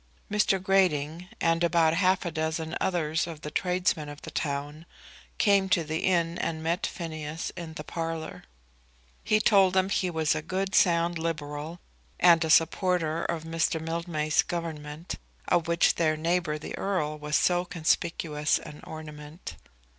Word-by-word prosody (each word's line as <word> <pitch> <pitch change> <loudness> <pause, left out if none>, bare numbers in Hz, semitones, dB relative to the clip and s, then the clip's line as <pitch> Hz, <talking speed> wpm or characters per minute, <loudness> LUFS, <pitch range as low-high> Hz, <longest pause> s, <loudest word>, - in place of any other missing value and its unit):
Mr. 210 -2 +2
Grating 180 -3 +1
and 165 0 +2
about 165 -2 +3
half 185 +2 +2
a 170 - -2
dozen 160 +1 -2
others 165 -3 0
of 160 -3 -8
the 150 - -6
tradesmen 180 -4 0
of 145 0 -9
the - - -7
town 145 +3 -3 0.5
came 200 -2 +3
to 185 -5 +3
the 160 +1 -3
inn, 170 -2 +1
and 160 -1 -2
met 170 +2 0
Phineas 160 -2 -5
in 165 -2 -7
the 150 - -6
parlour. 165 0 -5 0.8
He 215 - +3
told 195 -3 +4
them 190 0 +3
he 185 -2 0
was 160 -3 +1
a 155 - -2
good 190 +4 -3
sound 170 -1 +3
Liberal 155 0 -4 0.4
and 170 -2 +6
a 160 - -2
supporter 165 0 +2
of 165 -2 -2
Mr. 165 0 0
Mildmay's 165 -1 0
Government, 160 -1 -5 0.3
of 170 -1 +2
which 170 0 +3
their 155 -2 +1
neighbour 165 -1 0
the 150 - -6
Earl 155 -6 -1
was 150 0 -2
so 175 0 +3
conspicuous 155 -2 0
an 150 - -10
ornament. 150 +1 -9
165 Hz, 155 wpm, -28 LUFS, 155-175 Hz, 0.8 s, and